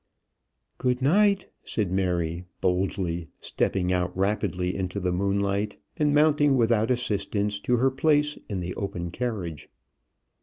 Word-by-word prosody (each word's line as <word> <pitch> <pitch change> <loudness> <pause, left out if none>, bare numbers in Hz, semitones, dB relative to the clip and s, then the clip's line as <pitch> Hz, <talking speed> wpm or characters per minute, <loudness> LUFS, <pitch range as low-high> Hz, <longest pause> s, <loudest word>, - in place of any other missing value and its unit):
"Good 125 -1 +1
night," 195 +8 +3 0.2
said 105 -5 -2
Mary, 90 -2 -1
boldly, 90 -2 -1
stepping 90 -1 0
out 90 0 -1
rapidly 95 -2 0
into 95 +1 -2
the 90 -1 0
moonlight, 100 +2 0 0.2
and 150 -3 +2
mounting 145 -2 +4
without 115 -2 +3
assistance 105 -4 -1
to 125 +4 +1
her 130 +3 +3
place 150 +1 +2
in 95 -3 -2
the 90 +1 -4
open 90 -4 -4
carriage. 90 -10 -4
100 Hz, 125 wpm, -26 LUFS, 90-125 Hz, 0.2 s, mounting